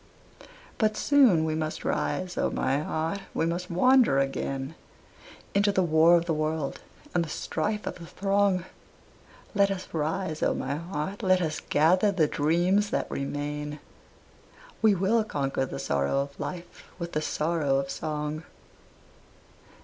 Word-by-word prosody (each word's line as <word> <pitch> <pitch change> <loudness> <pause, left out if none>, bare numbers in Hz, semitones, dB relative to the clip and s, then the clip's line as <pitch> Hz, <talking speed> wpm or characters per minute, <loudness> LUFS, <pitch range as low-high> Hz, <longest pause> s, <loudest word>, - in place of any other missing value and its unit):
But 215 -1 +2
soon 250 - +5
we 160 - -1
must 155 0 -3
rise, 185 -1 -1
O - - +1
my 135 +2 0
heart, 160 +5 -2 0.2
we - - +1
must 175 +2 -2
wander 245 - +4
again 135 +1 -2 0.8
Into 205 +1 +3
the 190 -2 +2
war 165 +1 +5
of 170 - -1
the 170 - 0
world 155 -1 -2 0.3
and 175 - +2
the 165 - -7
strife 210 +6 -2
of - - -5
the 170 - -9
throng; 195 -2 +1 0.9
Let 200 -1 +4
us 190 -1 -4
rise, 160 +1 -2
O - - +2
my 135 - -2
heart, 170 +4 -4
let 185 -1 +3
us 155 -3 -2
gather 180 +7 +4
the 175 -5 +3
dreams 175 +8 +2
that - - -2
remain, 145 +1 -4 1.0
We 215 -2 +5
will 205 +5 +2
conquer 135 -8 -2
the - - -6
sorrow 70 - 0
of 140 0 -7
life 175 -1 -6
with 170 -1 -5
the 155 - -1
sorrow 155 -3 0
of 135 0 -2
song. 150 0 -3
165 Hz, 150 wpm, -27 LUFS, 150-190 Hz, 1.0 s, soon